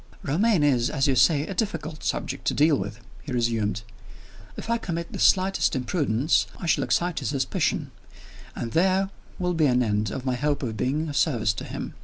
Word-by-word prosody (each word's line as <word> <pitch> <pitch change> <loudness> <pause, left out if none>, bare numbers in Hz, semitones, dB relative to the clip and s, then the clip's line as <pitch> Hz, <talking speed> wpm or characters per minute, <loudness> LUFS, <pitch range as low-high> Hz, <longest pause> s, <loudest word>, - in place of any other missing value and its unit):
"Romayne 180 +3 +2
is, 125 -5 +3
as 135 -2 0
you 135 - +2
say, 145 +3 +4
a 195 - -5
difficult 180 -6 -3
subject - - -3
to - - +1
deal 150 +1 +4
with," 105 +2 -5 0.2
he 145 - -8
resumed. 115 -3 0 0.7
"If - - -6
I 235 0 +1
commit 170 -5 -4
the - - -5
slightest 190 -4 +3
imprudence, 130 0 +1
I - - -7
shall 165 - +2
excite 175 -1 0
his - - -3
suspicion 135 -2 -1 0.6
and 115 - -4
there 190 - +2 0.3
will 180 -1 -1
be 160 -3 +3
an 125 -1 +3
end 105 -1 0
of 130 +5 -5
my 130 - +1
hope 145 +2 -1
of 115 -4 -3
being 140 +9 -1
of 145 - -5
service 120 -9 +2
to 110 - -6
him. - - -6
145 Hz, 195 wpm, -25 LUFS, 120-170 Hz, 0.7 s, say